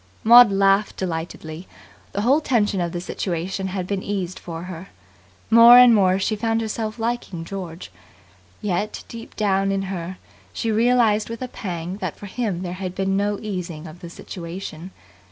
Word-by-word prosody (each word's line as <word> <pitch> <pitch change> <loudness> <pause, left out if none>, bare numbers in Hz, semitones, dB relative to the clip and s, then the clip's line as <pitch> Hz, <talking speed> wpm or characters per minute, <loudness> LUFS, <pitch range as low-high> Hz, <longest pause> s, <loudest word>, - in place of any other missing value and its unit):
Maud 235 -1 +8
laughed 195 +1 +2
delightedly. 165 -1 -5 0.5
The 200 - -1
whole 270 +8 +3
tension 210 -9 +1
of 170 -1 -2
the 175 - -4
situation 185 +1 -3
had 185 -1 -3
been 195 0 -2
eased 190 -3 -4
for 165 -1 -7
her. 185 0 -8 0.6
More 230 +2 +9
and 250 -1 +8
more 190 -3 +4
she 195 +3 0
found 225 +1 0
herself 220 0 -3
liking 225 -7 -3
George. 180 -3 -7 0.7
Yet, 205 +1 -2
deep 230 -1 -10
down 195 -2 +1
in 195 0 -1
her, 180 +1 -5 0.4
she 230 - -2
realized 225 -2 +3
with 230 +2 -5
a - - -3
pang 180 -5 -5
that - - -4
for - - -10
him 200 -4 -3
there 175 -1 -4
had 185 -1 -5
been 195 0 0
no 205 +1 0
easing 180 -6 -5
of 160 +2 -11
the 175 -2 -9
situation. 175 0 -8
195 Hz, 170 wpm, -22 LUFS, 180-220 Hz, 0.7 s, More